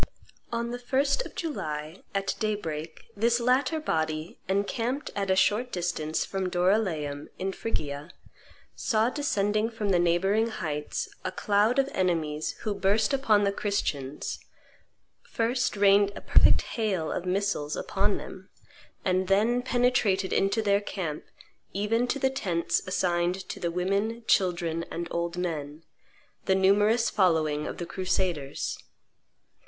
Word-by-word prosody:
On 235 0 -2
the 245 - -4
1st 275 - +1
of - - -18
July, 155 - -4
at 195 0 0
daybreak, 165 -7 -3
this 235 +3 +2
latter 255 +6 +2
body, 160 - -2
encamped 230 +8 -1
at 200 -1 -1
a 190 - +4
short 215 +6 +2
distance 170 -3 -1
from 190 -1 -2
Doryleum, 175 -6 0
in 190 +1 -2
Phrygia, 150 -8 -4 0.7
saw 225 0 +1
descending 215 -6 0
from 220 -3 -3
the 180 -2 +4
neighboring 195 +6 +2
heights 150 -9 -3 0.2
a - - -2
cloud 210 +4 +2
of 275 0 +3
enemies 160 - 0
who 215 - -1
burst 205 +5 +2
upon 220 -7 +3
the 200 - +2
Christians, 150 -10 -2 0.8
first 240 0 -1
rained 200 0 +5
a - - -7
perfect - - +5
hail 195 -8 -1
of 180 - -3
missiles 185 -6 0
upon - - 0
them, - - -10 0.6
and 185 0 +1
then 220 +6 +3
penetrated 245 -6 +2
into 195 +3 +2
their 200 -1 +3
camp, 170 -7 -4 0.5
even 225 +5 +1
to 280 - 0
the 265 -1 +1
tents 180 -10 0
assigned 180 0 0
to - - -5
the 170 - -1
women, 200 +6 -1
children, 170 -4 +1
and 170 0 -4
old 170 0 -2
men, 155 -3 -4 0.6
the 190 - +3
numerous 205 +4 +3
following 155 -6 +2
of - - -5
the 175 - -4
crusaders. 175 -6 -2
195 Hz, 135 wpm, -28 LUFS, 170-225 Hz, 0.8 s, rained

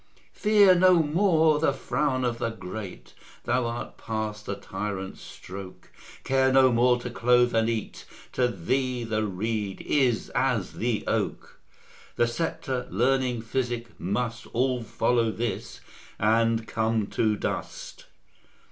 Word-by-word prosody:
Fear 205 -3 +5
no 180 -2 +6
more 160 -1 +3
the 150 -3 +2
frown 135 -1 -1
of 120 -1 -1
the 115 - 0
great, 105 -3 -8 0.3
Thou 120 0 +1
art 120 +1 -6
past 110 -1 -4
the 100 - -2
tyrant's 95 -1 -5
stroke: 95 0 -10 0.3
Care 130 0 +2
no 130 -1 +6
more 120 +1 +3
to 125 - -5
clothe 125 0 +3
and 115 0 +2
eat; 115 -2 -4 0.3
To 125 -1 +2
thee 125 +5 -1
the 110 -1 -1
reed 105 +1 -3
is 130 -6 +1
as 125 -8 0
the 115 -2 -1
oak: - - -3 0.6
The 120 - +3
sceptre, 130 0 -3
learning, 125 +2 +1
physic, 120 -1 -2
must 110 +4 -2
All 125 0 +1
follow 115 +1 +1
this, 110 -1 -4 0.4
and 115 +1 +2
come 110 -1 0
to 110 -1 +1
dust. - - -5
120 Hz, 130 wpm, -26 LUFS, 110-130 Hz, 0.6 s, no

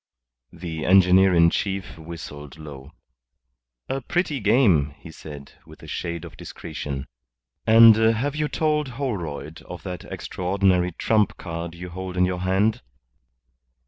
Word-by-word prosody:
The 80 -2 -6
engineer 95 0 +5
in 85 0 +5
chief 95 -2 -3
whistled 80 -3 -9
low. 75 -3 -10 1.0
"A 135 - -3
pretty 165 +1 -1
game," 100 - +3
he 85 - -12
said, 75 -3 -10
with - - -16
a - - -10
shade 85 0 -4
of 85 - -11
discretion. 70 -4 -6 0.6
"And 115 0 +9
have 115 +6 +1
you 150 0 0
told 150 -1 0
Holroyd 85 - -4
of 90 -2 -10
that 90 -2 -6
extraordinary 90 -1 0
trump 105 +4 +1
card 85 -1 -6
you 90 +1 -8
hold 95 +1 -6
in 90 - +4
your 90 -1 -2
hand?" 95 +4 +1
90 Hz, 135 wpm, -24 LUFS, 80-110 Hz, 1.0 s, And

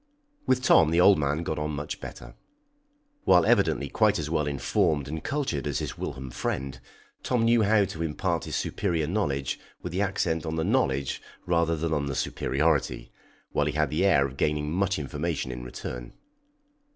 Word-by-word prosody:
With 125 0 +2
Tom 80 - +6
the 85 +2 +2
old 95 -1 +6
man 75 +3 0
got 80 -2 -2
on 75 0 -2
much 70 +1 -5
better. - - -9 0.9
While 90 -2 +5
evidently 70 - +2
quite - - +2
as 75 0 -3
well 75 -3 +1
informed 75 +1 0
and 80 +2 -5
cultured 135 - -2
as - - -1
his - - -3
whilom 65 -1 -6
friend, 65 +2 -3 0.4
Tom 120 -3 +1
knew 115 0 +4
how 105 -1 +4
to 85 -4 -7
impart 80 -2 -1
his - - -4
superior 85 -6 -1
knowledge 75 - -1 0.2
with - - -4
the 95 - 0
accent 95 -5 0
on 80 -1 -3
the 80 - 0
knowledge 80 - 0 0.2
rather 85 -1 +2
than 80 0 -2
on 70 -2 0
the 70 - -3
superiority, - - 0 0.4
while 75 - +1
he 75 - -1
had 75 +1 +1
the 80 +5 +1
air 85 -9 +4
of 70 0 -6
gaining 75 0 0
much 95 +2 +1
information 75 -1 -3
in - - -6
return. 60 0 -7
80 Hz, 180 wpm, -27 LUFS, 70-95 Hz, 0.9 s, Tom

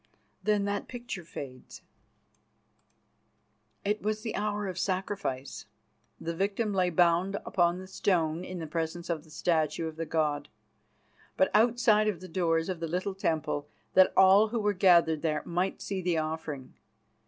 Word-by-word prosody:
Then 210 -1 +1
that 205 0 -2
picture 240 -7 -6
fades. 135 -6 -9 2.0
It 210 +1 0
was 215 0 -2
the 225 - -3
hour 210 0 -1
of 185 -1 -4
sacrifice. 185 -9 -3 0.5
The 170 - -3
victim 205 +3 0
lay 185 -2 +2
bound 175 +3 +3
upon 175 -1 +2
the 185 - -8
stone 175 -3 0
in 185 0 -6
the 165 - -4
presence 165 +2 -3
of 160 -3 -3
the 160 - -19
statue 160 0 0
of 160 0 -8
the 165 0 -3
god, 150 -2 0 0.9
but 190 - +3
outside 220 -1 +4
of 200 -6 -1
the 185 - -9
doors 165 -2 +1
of 185 -3 -3
the 165 - -3
little 180 +4 -2
temple, 155 -5 -2 0.2
that 185 0 +6
all 190 +3 +7
who 230 +2 -2
were 205 -1 +1
gathered 170 -5 +4
there 155 -2 -1
might 180 +3 -1
see 195 -2 -3
the 175 -2 0
offering. 155 -4 -4
180 Hz, 155 wpm, -29 LUFS, 160-200 Hz, 2.0 s, all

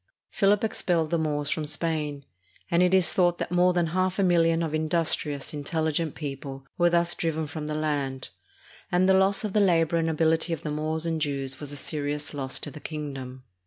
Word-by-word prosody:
Philip 200 +1 +3
expelled 170 -7 0
the 170 - +2
Moors 145 -2 -1
from 155 -2 -2
Spain, 150 -3 -2 0.5
and 170 +1 +4
it 180 0 +4
is 190 -3 +4
thought 175 -2 +3
that - - -4
more 180 +1 +4
than 175 -1 +1
half 185 0 +1
a 200 - +2
milhon 165 -2 +3
of 155 - -5
industrious, 155 -3 0
intelli 155 +1 -2
gent 160 -1 -1
people 135 -2 -6
were 175 0 +3
thus 170 0 +3
driven 160 -1 -2
from 150 0 -6
the 150 - -3
land, 145 -4 -2 0.6
and 180 +1 +3
the 190 - +5
loss 195 +1 +3
of 210 -3 -3
the 215 - +3
labor 170 -4 +3
and 165 0 +1
ability 160 +1 +1
of 160 - -5
the 150 - -3
Moors 155 +2 -2
and 165 -1 -1
Jews 140 -3 -2
was 145 -1 -6
a - - -6
serious 145 +1 -3
loss 135 -2 -2
to 145 - -5
the 150 - -10
kingdom. 135 -5 -6
160 Hz, 205 wpm, -26 LUFS, 145-175 Hz, 0.6 s, the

